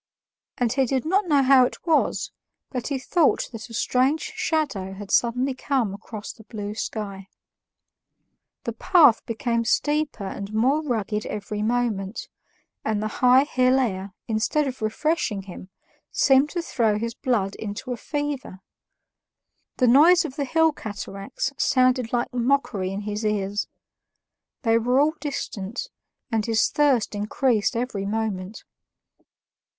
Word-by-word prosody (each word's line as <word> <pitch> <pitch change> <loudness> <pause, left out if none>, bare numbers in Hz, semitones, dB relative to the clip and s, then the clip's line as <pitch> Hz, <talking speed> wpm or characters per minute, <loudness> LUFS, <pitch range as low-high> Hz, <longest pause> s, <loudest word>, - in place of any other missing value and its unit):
And 240 -2 +1
he 270 -1 +2
did 265 +2 -1
not 380 +4 +1
know 285 -4 +4
how 260 -1 +6
it 250 - -3
was, 325 -3 +1 0.4
but 250 -3 -3
he 280 - -1
thought 305 +4 +2
that 225 0 -8
a - - -11
strange 280 - +1
shadow 310 - -1
had 195 0 -9
suddenly 250 +3 +2
come 255 -5 -1
across 215 +1 -8
the 220 - -16
blue 210 -2 -5
sky. 200 -3 -5 1.4
The - - -3
path 295 -11 +5
became 235 0 -1
steeper 295 0 0
and 200 +1 -6
more 265 +7 +3
rugged 220 -7 -2
every 210 0 -4
moment, 220 -3 -1 0.5
and 215 -1 0
the 215 - -1
high 255 +1 +6
hill 255 -2 +2
air, 195 -6 -2
instead 230 +7 +1
of 260 -3 -5
refreshing 215 - -1
him, 185 0 -10 0.4
seemed 270 +1 +4
to 345 0 -3
throw 225 -9 +1
his 230 +2 -3
blood 215 -6 -1
into 215 +4 -6
a - - -1
fever. 285 -7 -4 1.2
The 255 - +3
noise 305 +9 +6
of 260 - -6
the 285 -2 -1
hill 320 +4 +3
cataracts 200 -1 -5
sounded 255 -2 +2
like 240 +1 -1
mockery 240 -6 0
in 195 +1 -4
his 210 +1 -4
ears; 205 -1 -1 1.0
they 230 -1 +3
were 250 +3 +2
all 300 +2 +3
distant, 235 - -4 0.4
and 220 -2 +1
his 225 0 +2
thirst 275 -8 +2
increased 210 +2 0
every 230 -5 -2
moment. 210 -2 -3
235 Hz, 140 wpm, -24 LUFS, 210-275 Hz, 1.4 s, how